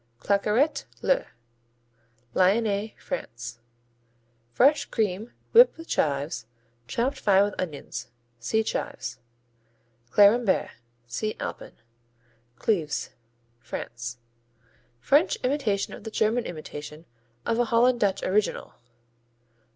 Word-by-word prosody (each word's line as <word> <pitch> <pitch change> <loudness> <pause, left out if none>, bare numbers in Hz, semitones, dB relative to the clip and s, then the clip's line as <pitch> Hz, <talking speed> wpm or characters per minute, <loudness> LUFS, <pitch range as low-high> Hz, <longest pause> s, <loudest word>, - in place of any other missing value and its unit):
Claqueret, 210 +9 +1 0.2
le - - +2 1.1
Lyonnais, 205 +2 +2
France 120 - -6 0.9
Fresh 275 - +4
cream 215 0 -1 0.2
whipped 480 -3 +7
with 330 +1 -10
chives, 140 -5 -1 0.4
chopped 250 - -1
fine 200 -1 +5
with 205 0 -1
onions. 140 -8 -5 0.3
See 220 - +1
Chives. 125 - -4 0.9
Clérimbert 205 - +4 0.3
see 170 - -3
Alpin. - - -6 0.8
Cleves 160 - -1 0.5
France 120 0 -6 0.8
French 290 - +3
imitation 250 -7 0
of - - -10
the 220 - -5
German 225 +2 +1
imitation 155 -1 -8 0.4
of 230 - +1
a 240 - +4
Holland 240 +1 +3
Dutch 200 -3 +1
original. 205 +2 0
205 Hz, 95 wpm, -26 LUFS, 150-235 Hz, 1.1 s, whipped